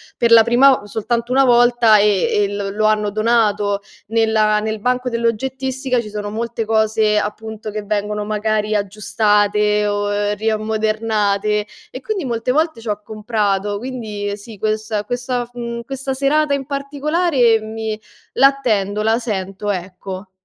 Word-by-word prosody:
per 235 -1 +1
la 230 -1 +9
prima 250 +2 +4
soltanto 235 +3 -2
una 270 +1 +5
volta 240 -3 +5
e 205 -2 +2
e 205 -1 +2
l 200 -1 -3
lo 215 +1 0
hanno 210 -1 +2
donato 210 -2 +1 0.3
nella 220 -1 +2
nel 220 0 -3
banco 250 +3 0
dell'oggettistica 255 +2 -1
ci 215 - -5
sono 205 0 -5
molte 230 +2 -3
cose, 220 -1 +2
appunto, 215 +1 -4
che 210 0 -5
vengono 210 0 -2
magari 215 0 -1
aggiustate 210 0 +1
o 205 0 -1
riammodernate 215 -1 0 0.2
e - - -7
quindi 435 -7 -3
molte 240 -1 -1
volte 315 -3 0
c'ho 210 -2 -3
comprato, 205 -2 -1
quindi, 210 -4 -5
sì, 215 +1 -12
questa 215 0 -2
questa 245 +2 -3
mhmm, 235 -1 -5
questa 270 +2 -4
serata 285 +2 +1
in 275 -1 -2
particolare 280 -3 +1
mi 220 0 -5 0.4
l'attendo, 220 -7 +2
la 220 +1 +2
sento, 205 -3 -3
ecco. 185 +1 -6
220 Hz, 140 wpm, -19 LUFS, 210-240 Hz, 0.4 s, la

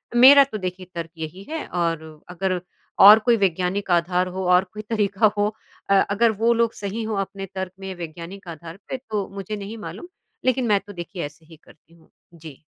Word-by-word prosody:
मेरा 275 +4 +9
तो 265 -6 -6
देखिए 185 -1 -5
तर्क़ 165 -1 -5
यही 160 +5 -6
है 320 0 -4
और 165 -2 -1 0.3
अगर 180 0 -2 0.4
और 210 +2 +11
कोई 230 +1 +3
वैज्ञानिक 190 +1 0
आधार 180 +1 +2
हो 190 - -2
और 180 +1 +5
कोई 215 - -6
तरीका 210 -1 +2
हो 205 0 +2 0.4
अ 195 -1 +5
अगर 220 +3 +3
वो 235 +1 +4
लोग 230 -1 +1
सही 205 +3 -4
हो 220 -1 -3
अपने 195 0 -8
तर्क़ 190 -1 -3
में 190 -1 -6
वैज्ञानिक 175 +3 -8
आधार 165 +1 -9
पे 265 - -2
तो 210 -3 -2
मुझे 200 +2 -5
नहीं 205 +2 -7
मालूम, 225 +10 -8 0.4
लेकिन 255 -1 +2
मैं 205 -2 +4
तो 205 - -9
देखिए 175 0 -6
ऐसे 150 +3 -12
ही 160 +1 -15
करती 165 - -22
हूँ। 165 -1 -23 0.2
जी। 160 -4 -12
195 Hz, 200 wpm, -23 LUFS, 175-215 Hz, 0.4 s, और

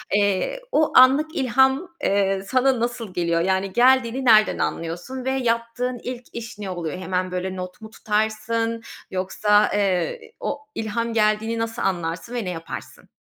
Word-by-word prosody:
eee, 205 - +1
o 310 0 +2
anlık 280 +6 +6
ilham, 265 +5 +2 0.2
eee, 195 -1 +2
sana 260 +2 +2
nasıl 235 -4 -3
geliyor? 170 -2 +1
Yani, 190 +1 0
geldiğini 255 +1 +3
nereden 215 -3 +5
anlıyorsun 175 +11 -4
ve 265 - +1
yaptığın 245 0 -1
ilk 250 0 -5
iş 230 -2 -7
ne 205 -2 -5
oluyor? 175 -3 -4
Hemen, 185 0 -2
böyle, 185 +1 -3
not 185 +2 -7
mu 220 - -9
tutarsın 220 +2 -1 0.3
yoksa, 205 +3 +2
eee, 190 -5 0 0.2
o 285 - -3 0.2
ilham 230 +1 -2
geldiğini 220 +1 +1
nasıl 225 0 -3
anlarsın 175 +3 -2
ve 235 -4 -2
ne - - -2
yaparsın? 165 -2 -8
220 Hz, 150 wpm, -23 LUFS, 190-245 Hz, 0.3 s, anlık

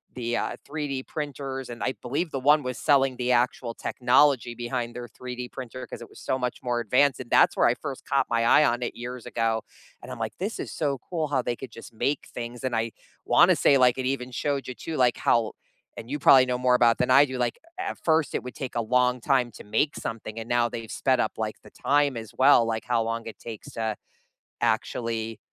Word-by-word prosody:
the, 120 -1 -2
uh, - - -2
3D 145 -3 -4
printers, 135 -4 -5
and 120 - -6
I 130 - 0
believe 150 +7 -2
the 135 - -2
one 145 +2 +4
was 125 0 -4
selling 135 -3 +3
the 125 0 0
actual 120 -1 +1
technology 125 -1 +2
behind 120 0 -4
their 120 0 -6
3D 125 +1 -7
printer 130 0 -7
'cause - - -9
it 120 - -10
was - - -15
so 130 - -2
much 125 -1 -3
more 120 -1 0
advanced, 125 +4 +2
and - - -8
that's - - +5
where - - +4
I - - +2
first - - -7
caught - - +2
my 115 0 +1
eye 150 - +6
on 120 +1 +1
it 120 - -3
years 125 0 -7
ago, 115 -1 0 0.4
and - - -9
I'm, 125 - -6
like, 110 -1 -3
"This 205 +4 -3
is - - -5
so 140 -3 -1
cool 160 -4 -1
how 130 -3 0
they 120 - -1
could 130 -1 -9
just 115 0 -12
make 140 +5 -1
things." 120 0 -6
And 125 -3 -1
I 115 0 -1 0.3
wanna - - +5
say, 140 - +4
like, 125 0 +4
it 130 - -2
even 130 -2 -2
showed 140 +2 -2
you, 125 - -4
too 160 +5 -6
like, 125 -2 +3
how 115 -2 +2 0.4
and 115 - -8
you 145 - -2
probably 130 -2 +7
know 125 -1 -1
more 125 0 +3
about 120 -1 +4
than 125 0 +1
I 140 +3 +7
do 130 -1 -5
like, 120 -1 -1 0.2
a - - -1
at - - -11
first, 160 -2 +2
it - - -1
would 125 - -8
take 130 -3 -5
a 120 - +1
long 125 +2 +2
time 125 -3 +2
to - - -12
make 145 +8 0
something, 115 0 -5
and 115 - -7
now 120 -1 +2
they've 115 -1 -7
sped 130 -2 +1
up, 110 - 0
like, 110 -1 -4
the - - -15
time 145 -2 +1
as 110 -2 -7
well, 130 -2 +6
like, 110 -1 -2
how 120 -1 +1
long 115 0 -3
it 115 - -8
takes 115 -3 -9
to 110 -2 -2 0.7
actually, 115 -1 -1
125 Hz, 235 wpm, -26 LUFS, 115-135 Hz, 0.7 s, probably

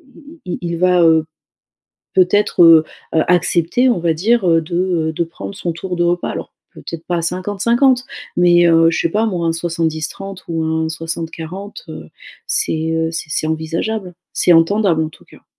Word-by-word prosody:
il - - -16 0.2
il 180 - -4
il 170 -1 -3
il - - -2
va, 180 0 +3
heu, 160 -1 +4 0.9
peut-être, 190 +1 +3
heu, 165 -1 +7 0.3
heu, 160 - +4
accepter, 175 +7 +2
on 235 - +1
va 165 -1 +1
dire, 205 +4 +1
heu, 165 -1 +4
de 160 +2 -7
heu, 175 -3 0
de 170 - -1
prendre 170 +4 -9
son 175 -3 -3
tour 180 +2 -5
de 175 - 0
repas, 175 0 0
alors - - -6 0.2
peut-être 165 -1 -8
pas 175 -1 -1
à - - -3
50-50 230 +9 +1 0.3
mais, 175 -1 +5
heu, 165 0 +5
je 165 - -2
sais - - +1
pas 215 +5 +1
moi, 175 -6 -2
un 165 - +1
70-30 165 +3 -4
ou 165 -1 -2
un 160 0 -1
60-40, 165 +4 -6
heu, 80 - -9 0.4
c'est, 160 0 -1
heu, 160 0 0
c'est 165 - -5
c'est 155 - -1
envisageable, 165 +5 -3 0.2
c'est 175 - +3
entendable, 165 -1 +3
en - - -4
tout - - -19
cas. - - -19
170 Hz, 190 wpm, -17 LUFS, 160-185 Hz, 0.9 s, heu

